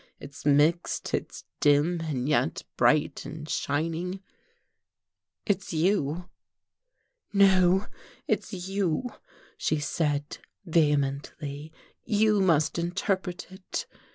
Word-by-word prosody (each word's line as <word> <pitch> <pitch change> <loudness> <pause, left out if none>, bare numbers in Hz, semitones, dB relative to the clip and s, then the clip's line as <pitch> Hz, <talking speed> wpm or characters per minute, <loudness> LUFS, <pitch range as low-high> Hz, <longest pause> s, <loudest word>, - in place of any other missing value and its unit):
It's 140 +1 -8
mixed, 150 +4 +2
it's - - -3 0.2
dim, 150 +4 +3
and 140 -5 -2
yet 145 - +1
bright 150 -1 +2
and 155 0 -8
shining 165 +6 -2 1.3
it's 190 -4 -1
you." 170 -1 +1 1.0
"No, 190 -1 +5 0.4
it's - - -1 0.2
you," 195 +4 -1 0.5
she 155 - 0
said 150 -1 -1 0.3
vehemently. 145 -1 0 0.3
"You 215 0 +3
must 165 -3 +2
interpret 180 +1 -2
it." 190 0 -5
165 Hz, 90 wpm, -27 LUFS, 145-185 Hz, 1.3 s, No